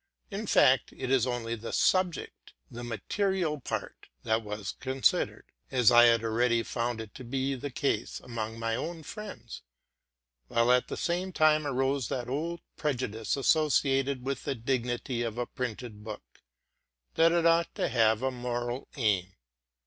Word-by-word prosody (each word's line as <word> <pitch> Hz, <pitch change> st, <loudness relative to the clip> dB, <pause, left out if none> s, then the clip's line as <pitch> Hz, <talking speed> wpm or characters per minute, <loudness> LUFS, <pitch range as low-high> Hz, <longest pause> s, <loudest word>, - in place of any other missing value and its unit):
In 205 Hz, +2 st, -4 dB
fact, 130 Hz, -6 st, +4 dB
it 130 Hz, -, -4 dB
was 130 Hz, -2 st, +3 dB
only 120 Hz, -2 st, -2 dB
the 115 Hz, 0 st, -5 dB
subject, 185 Hz, -3 st, 0 dB, 0.2 s
the 120 Hz, +1 st, -7 dB
material 165 Hz, -, -1 dB
part, -, -, -5 dB, 0.2 s
that 110 Hz, +1 st, +1 dB
was 105 Hz, -2 st, -5 dB
considered, 130 Hz, 0 st, +1 dB, 0.2 s
as 125 Hz, -2 st, +4 dB
I 120 Hz, 0 st, +8 dB
had 115 Hz, -1 st, +4 dB
already 115 Hz, +1 st, +2 dB
found 115 Hz, -3 st, -3 dB
to 130 Hz, -, -9 dB
be 135 Hz, +3 st, -1 dB
the 135 Hz, +2 st, -4 dB
case 140 Hz, +2 st, -1 dB
among 115 Hz, -2 st, -5 dB
my 115 Hz, 0 st, -1 dB
own 160 Hz, +6 st, -4 dB
friends; 200 Hz, -, -8 dB, 0.9 s
while 115 Hz, -, +3 dB
at 125 Hz, 0 st, +3 dB
the -, -, -5 dB
same 180 Hz, +2 st, -1 dB
time 155 Hz, -3 st, +3 dB
arose 135 Hz, -2 st, 0 dB
that 125 Hz, -2 st, -3 dB
old 165 Hz, +6 st, -3 dB, 0.2 s
prejudice, 125 Hz, -6 st, -1 dB
associated 135 Hz, -3 st, +2 dB
with 140 Hz, 0 st, -2 dB
the 140 Hz, -, -2 dB
dig 125 Hz, +1 st, -1 dB
nity 120 Hz, 0 st, -2 dB
of 115 Hz, -1 st, -4 dB
a 120 Hz, -, -1 dB
printed 120 Hz, -4 st, -6 dB
book, 105 Hz, -1 st, -10 dB, 0.3 s
— -, -, -52 dB
that 165 Hz, +1 st, +5 dB
it 170 Hz, -1 st, +2 dB
ought 165 Hz, 0 st, +3 dB
to -, -, 0 dB
have 110 Hz, -1 st, +3 dB
a 130 Hz, -, +1 dB
moral 120 Hz, 0 st, -3 dB
aim. 100 Hz, -7 st, 0 dB
125 Hz, 160 wpm, -29 LUFS, 115-140 Hz, 0.9 s, I